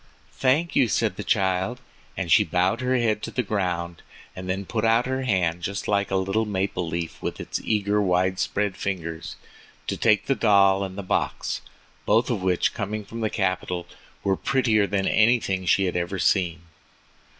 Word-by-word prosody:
"Thank 135 - +1
you," 130 - +4
said 110 -2 0
the - - -5
child, 95 +4 0 0.4
as 90 -3 -2
she 75 - +7
bowed 90 +8 +1
her 130 0 +1
head 110 -3 +1
to - - -4
the 125 - -1
ground, 90 -5 -2 0.3
and 95 0 -7
then 95 +1 -2
put 110 +2 -2
out 115 +1 +3
her 130 +1 -2
hand 90 -6 +1
just 100 +3 -4
like 100 -1 +1
a 95 - -1
little 95 +4 +1
maple 95 -3 -2
leaf 85 0 -4
with - - -4
its - - -4
eager 105 -1 +1
wide 95 -1 +1
spread 105 -2 -1
fingers 85 -5 -4 0.5
to - - -2
take 105 -2 +3
the 135 - +2
doll 100 -4 +4
and 95 0 -6
the 100 - -4
box, 95 - -1 0.5
both 115 +2 +3
of 110 -5 -1
which, 90 -1 +1
coming 105 -1 -4
from 115 +3 -7
the 110 - 0
capital, 95 -3 -2 0.4
were 95 -1 +2
prettier 115 -4 +2
than 100 0 0
anything 105 -5 +2
she 100 +2 +4
had 90 - -2
ever 90 +2 -2
seen. 85 -3 +1
100 Hz, 185 wpm, -24 LUFS, 90-110 Hz, 0.5 s, she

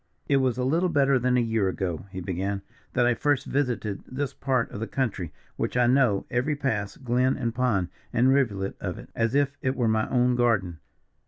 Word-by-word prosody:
"It 140 - +4
was 130 -3 +1
a 125 - 0
little 165 +8 +2
better 140 -4 +3
than 125 +1 +2
a - - +4
year 110 -4 +1
ago," 95 -1 -3
he 95 -1 -6
began, 95 +2 -3 0.3
"that 125 -1 +3
I 120 - +4
first 145 +3 +1
visited 125 -7 -1
this 140 +1 -3
part 130 -4 0
of - - -6
the 115 - -3
country, 100 - -2 0.3
which - - -1
I 125 - +4
know 120 -5 +3
every 130 +5 +1
pass, 110 -8 -2
glen, 125 +1 +1
and 120 -4 -2
pond, 115 -8 +1 0.2
and 130 +3 +4
rivulet 100 -8 0
of - - -3
it - - -12
as 115 +2 0
if 140 0 +2
it 130 +1 0
were 120 -4 +1
my 110 0 +1
own 125 -1 +3
garden. 100 -9 +1
120 Hz, 205 wpm, -26 LUFS, 105-130 Hz, 0.3 s, It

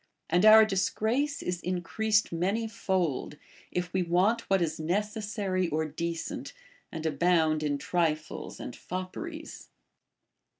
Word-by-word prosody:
* - - -51
And 180 +5 +5
our 220 0 +10
disgrace 220 +8 0
is 180 -1 -2
increased 200 +4 0
many 195 +7 0
fold, 185 - -1 0.3
if 180 -1 -2
Ave 185 +1 0
want 205 +7 +2
what 195 0 +4
is 160 -2 -1
necessary 205 +1 -1
or 160 0 0
decent, 165 +2 -4 0.4
and 160 -1 -6
abound 160 -1 +2
in 145 -2 0
trifles 155 0 -2
and 120 - -6
fopperies. 310 - -6
180 Hz, 125 wpm, -29 LUFS, 165-215 Hz, 0.4 s, our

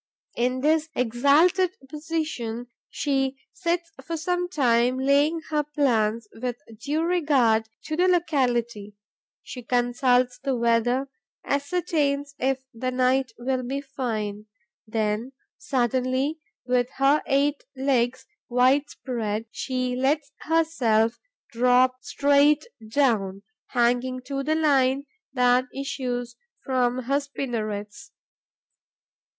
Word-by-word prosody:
In 255 +2 0
this 315 +2 +2
exalted 290 +10 +3
position, 300 -6 -4 0.2
she 270 -2 -1 0.2
sits 340 -2 -2
for 330 0 -4
some 355 +2 -1
time 250 -5 +2
laying 285 +5 +2
her 300 -1 +2
plans 235 -7 0
with 245 +1 -3 0.2
due 295 +5 -1
regard 275 -11 +2
to 310 - -3
the 360 +3 +3
locality; 245 - 0 0.5
she 250 - -8
consults 245 +1 +1
the 270 -1 -1
weather, 235 +3 +1 0.4
ascertains 285 -1 0
if 265 0 0
the 255 +3 -3
night 255 0 +1
will 255 +1 -1
be 265 +3 -3
fine. 220 -7 -4 0.4
Then, 220 +3 -1 0.3
suddenly, 260 +1 0 0.3
with 250 0 +1
her 275 +2 +4
eight 280 +1 +1
legs 260 -2 +1 0.2
wide 260 +4 +3
spread, 225 -4 -3
she 255 -1 -2
lets 285 +3 0
herself 250 -9 +1 0.3
drop 250 +2 +3
straight 285 +1 +3 0.2
down, 210 -7 +1 0.2
hanging 245 +1 +1
to 275 +1 -3
the 310 +3 0
line 280 -3 +2 0.3
that 250 -1 +3
issues 245 -3 -4 0.3
from 255 -1 0
her 275 +4 +1
spinnerets. 235 -2 -5
260 Hz, 105 wpm, -25 LUFS, 240-290 Hz, 0.5 s, her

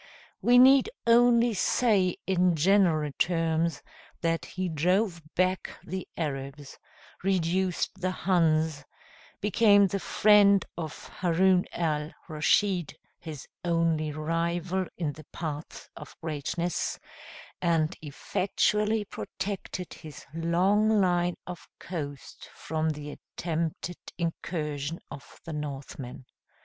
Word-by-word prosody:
We 245 +1 +5
need 265 +1 +7 0.2
only 235 0 +5
say 195 -3 +2
in 180 -2 +2
general 165 -3 +3
terms, 165 -2 +1 0.4
that 165 -1 0
he 185 0 -3
drove 175 +3 +1
back 185 +1 0
the 185 +2 -5
Arabs, 140 -2 -5 0.4
reduced 185 0 0
the 185 - +1
Huns, 160 -5 +1 0.6
became 205 0 +5
the 195 +1 -1
friend 200 -1 +5
of 160 -3 -6
Haroun 180 +1 +3
al 155 -2 -1 0.2
Raschid, 175 +2 +1 0.2
his 155 -5 -8 0.2
only 165 -3 +1
rival 170 +4 -1
in 155 -4 -2
the 155 - -13
paths 155 -2 -6
of - - -12
greatness, 165 +2 -2 0.6
and 165 -3 +1
effectually 210 +7 0
protected 190 -2 -5
his 155 -3 -11
long 190 +6 +2
line 175 -2 +2
of 175 -4 -9
coast 145 -6 -7
from 160 0 -2
the 150 -1 -5
attempted 165 +2 -4 0.2
incursion 160 -3 -3
of 140 - -11
the 165 - -5
Northmen. 135 -3 -6
170 Hz, 105 wpm, -28 LUFS, 155-190 Hz, 0.6 s, need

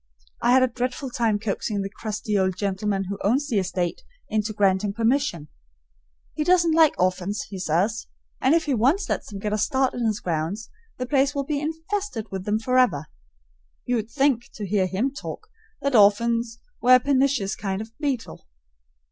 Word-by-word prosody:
I 245 - +4
had 260 0 +6
a - - +4
dreadful 250 +2 -3
time 230 -4 +1
coaxing 205 -1 -2
the 195 - -4
crusty 215 0 -4
old 190 -2 +1
gentleman 200 0 -1
who 200 +1 -5
owns 265 +8 +2
the 225 -8 +1
estate 180 -2 -2 0.3
into 215 0 0
granting 200 -1 +1
permission. 230 - 0 0.9
He 305 - -1
doesn't 345 -1 +4
like 320 -2 +4
orphans, 185 +6 0
he 195 - -5
says, 185 +7 0 0.3
and 265 +5 +4
if 335 - +1
he 290 - 0
once 265 - +2
lets - - -2
them 205 - -7
get 210 +1 -3
a 215 - 0
start 265 +2 +1
in 240 -2 -1
his 215 -1 -1
grounds, 170 +6 -3 0.3
the 250 - -3
place 275 +2 +2
will 280 - 0
be 290 0 -2
infested 320 - -4
with 190 -1 -5
them 210 +1 +1
forever. 225 - +2 0.8
You 245 -1 +1
would 220 0 -4
think, 270 -2 +1
to 210 - -5
hear 195 -1 +1
him 220 +9 -1
talk, 435 +8 -8 0.3
that 280 -1 0
orphans 230 +2 +3 0.2
were 255 +1 +7
a - - +6
pernicious 265 -6 +1
kind 195 -1 -3
of 220 +1 -8
beetle. 260 - -3
225 Hz, 180 wpm, -24 LUFS, 200-270 Hz, 0.9 s, were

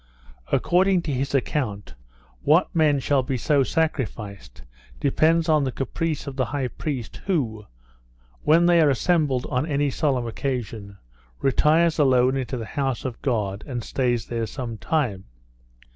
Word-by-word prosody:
According 185 0 +3
to 150 - -2
his 135 +2 -1
account, 120 -6 -2 0.5
what 160 +5 +3
men 150 -3 +3
shall 135 +1 +2
be 130 0 -2
so 140 +4 +2
sacrificed, 110 - -3 0.4
depends 165 - +2
on 155 -2 +3
the 130 - -1
caprice 155 +4 -3
of 140 -2 -6
the 130 - +1
high 135 -3 -2
priest, 130 -6 -5
who, 115 - -1 0.7
when 165 +3 +4
they 175 -1 +5
are 150 - +5
assembled 140 -2 +1
on 125 +5 0
any 145 -2 0
solemn 130 -4 0
occasion, 115 -5 -4 0.4
retires 155 +5 +3
alone 130 -2 +4
into 130 -1 -3
the 115 - -5
house 135 +1 -2
of 125 -3 -5
God, 105 -6 -1
and 120 -4 -4
stays 120 -3 -1
there 115 -2 -3
some 115 -3 -6
time. 120 -12 -1
135 Hz, 145 wpm, -24 LUFS, 120-155 Hz, 0.7 s, they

